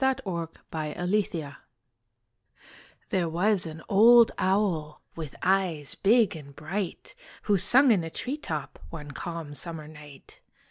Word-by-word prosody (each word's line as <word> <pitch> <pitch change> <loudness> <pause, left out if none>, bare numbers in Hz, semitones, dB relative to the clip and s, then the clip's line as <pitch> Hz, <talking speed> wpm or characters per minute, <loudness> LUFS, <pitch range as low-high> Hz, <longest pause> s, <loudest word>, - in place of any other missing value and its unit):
THE 265 -1 +2
OWL 170 -4 -3 0.2
AND 155 -2 -4
THE 210 -1 +2
CROW 150 -4 -6 1.6
There 175 -3 +1
was 180 +2 +2
an 160 0 -9
old 230 +3 +7
owl 185 -6 0
With 155 -5 -7
eyes 180 -7 +1
big 220 -2 +3
and 140 -3 -11
bright, 175 +5 -5 0.3
Who 205 -2 +2
sung 265 +7 +5
in 190 -6 +3
a 165 - -5
tree 260 - -4
top 155 - -5
One 150 -4 -8
calm 165 -1 -6
summer 160 0 -5
night. 150 -2 -14
170 Hz, 140 wpm, -27 LUFS, 155-205 Hz, 1.6 s, old